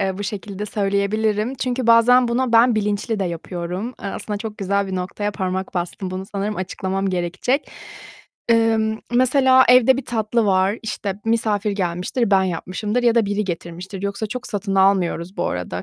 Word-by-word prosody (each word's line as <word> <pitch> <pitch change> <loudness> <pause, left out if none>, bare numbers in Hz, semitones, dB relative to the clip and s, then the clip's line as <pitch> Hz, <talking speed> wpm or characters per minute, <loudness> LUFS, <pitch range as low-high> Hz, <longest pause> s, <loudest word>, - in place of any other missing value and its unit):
Eee, 190 -1 -1
bu 205 - -3
şekilde 205 0 -5
söyleyebilirim. 210 +3 0
Çünkü 255 -1 -2
bazen 235 +2 +6
bunu 240 0 0
ben 230 +1 +5
bilinçli 210 +1 -1
de - - +1
yapıyorum; 175 +6 -5
eee, 200 - -3
aslında 210 +1 -4
çok 215 0 -7
güzel 200 0 0
bir 190 -1 -3
noktaya 200 +3 -3
parmak 190 -1 -3
bastın, 180 +2 -3
bunu 190 +1 -5
sanırım 205 +1 -3
açıklamam 190 +1 -2
gerekecek. 185 - -1 0.8
Eee, 225 -1 +4 0.4
mesela 260 +1 +5
evde 250 +1 +6
bir 265 - -4
tatlı 225 0 0
var, 190 +2 +2
işte 205 -3 -3
misafir 220 -2 0
gelmiştir, 195 +5 -1
ben 190 -1 +5
yapmışımdır 190 +7 -2
ya 235 -1 +4
da 230 -3 +3
biri 205 +1 -1
getirmiştir. 180 +2 -6
Yoksa 200 +2 -2
çok 250 +4 -6
satın 200 -2 -3
almıyoruz 190 -2 +2
bu 175 - -1
arada, 90 0 -4
205 Hz, 165 wpm, -21 LUFS, 190-230 Hz, 0.8 s, bazen